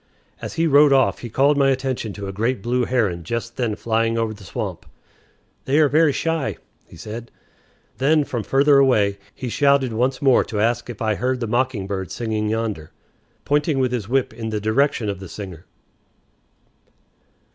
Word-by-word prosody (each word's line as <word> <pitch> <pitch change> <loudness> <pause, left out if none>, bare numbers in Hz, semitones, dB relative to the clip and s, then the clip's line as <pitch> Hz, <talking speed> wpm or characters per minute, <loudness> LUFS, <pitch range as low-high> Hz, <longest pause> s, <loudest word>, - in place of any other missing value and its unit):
As - - -6
he 165 0 +1
rode 145 -1 +6
off 135 -1 +3
he 120 - -7
called 140 +5 +3
my 135 -1 +4
attention 130 -4 -2
to 100 0 -7
a 95 - -5
great 110 +1 -1
blue 125 +1 0
heron 105 -9 0
just 115 +5 -4
then 115 -4 -1
flying 115 +1 0
over 115 -1 -1
the 105 -1 -14
swamp. 90 - -5 0.8
"They 135 +2 +1
are 155 -1 +5
very 155 +1 +4
shy," 155 - -2 0.3
he - - -15
said. 110 +6 -8 0.7
Then, 150 +3 +3
from 120 -4 -3
further 140 +4 +4
away, 105 -7 +3 0.2
he 130 - -6
shouted 140 -1 +2
once 125 +3 0
more 135 -3 +4
to 105 - -4
ask 120 +2 0
if 115 -2 -6
I 110 -1 +1
heard 125 +4 -1
the 120 - -2
mocking 120 -2 -1
bird 95 -2 -4
singing 110 -2 -2
yonder, 110 -8 -3 0.6
pointing 145 0 +1
with 130 -2 +1
his 115 -4 -3
whip 130 -2 0
in 110 -1 -5
the 110 -1 -2
direction 110 +2 +1
of 100 -2 -3
the 95 -2 -9
singer. 90 -3 -9
120 Hz, 180 wpm, -21 LUFS, 105-135 Hz, 0.8 s, rode